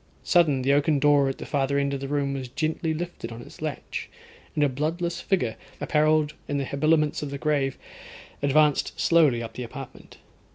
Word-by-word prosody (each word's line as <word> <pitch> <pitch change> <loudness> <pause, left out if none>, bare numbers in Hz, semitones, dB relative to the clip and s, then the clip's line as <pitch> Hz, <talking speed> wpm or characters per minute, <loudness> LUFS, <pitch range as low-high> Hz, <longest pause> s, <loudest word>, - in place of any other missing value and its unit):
Sudden 150 -7 +3
the 140 +2 +3
oaken 145 +1 +3
door 145 -1 +4
at 135 - -4
the - - -7
farther 140 -1 0
end 140 0 0
of 140 - -2
the 135 - -5
room 140 -1 0
was 135 -2 -4
gently 155 +5 -2
lifted 160 -7 -5
on 115 - -8
its - - -14
latch, - - -4 0.5
and 150 - +2
a - - +5
bloodless 160 +6 -2
figure, 125 - 0 0.2
apparelled 155 -1 +2
in 145 - -1
the 140 - -1
habiliments 150 +2 +1
of 150 - -4
the 140 - -4
grave, 140 -2 0 0.6
advanced 145 +1 +2
slowly 150 -9 +4
up 115 -1 -7
the 125 - -6
apartment. 130 +2 -9
145 Hz, 190 wpm, -26 LUFS, 135-155 Hz, 0.6 s, a